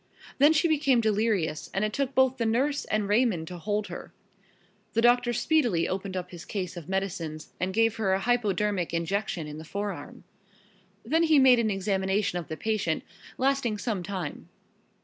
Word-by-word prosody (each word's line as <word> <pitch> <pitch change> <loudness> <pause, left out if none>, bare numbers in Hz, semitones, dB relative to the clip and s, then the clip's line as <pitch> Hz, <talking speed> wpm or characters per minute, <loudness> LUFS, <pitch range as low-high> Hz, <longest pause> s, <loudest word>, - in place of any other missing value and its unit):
Then 290 +3 +7
she 320 +2 +3
became 285 -5 +3
delirious 210 -8 0
and 195 +2 +2
it 215 - -3
took 275 +1 -2
both 260 0 +3
the 230 - -1
nurse 270 +6 +1
and 215 -1 -1
Raymond 205 -6 +2
to 180 -1 -7
hold 210 +3 -1
her. - - -8 0.8
The 230 - +2
doctor 240 0 +4
speedily 240 - +2
opened 190 0 -3
up 180 -1 -5
his 175 -2 -9
case 185 -4 -4
of 170 -2 -9
medicines 170 -5 -3
and 185 +1 -1
gave 225 +2 +2
her 210 -4 +1
a 190 - +2
hypodermic 210 -6 0
injection 170 0 -2
in 150 0 -7
the - - -8
forearm. 195 -3 -6 0.8
Then 315 +8 +2
he 320 -2 +4
made 260 -3 +6
an 225 -2 +1
examination 195 -1 0
of 170 - -8
the 155 - -5
patient, 215 -8 -1 0.3
lasting 265 -4 +1
some 205 -2 -2
time. 180 -4 -5
210 Hz, 175 wpm, -27 LUFS, 185-240 Hz, 0.8 s, Then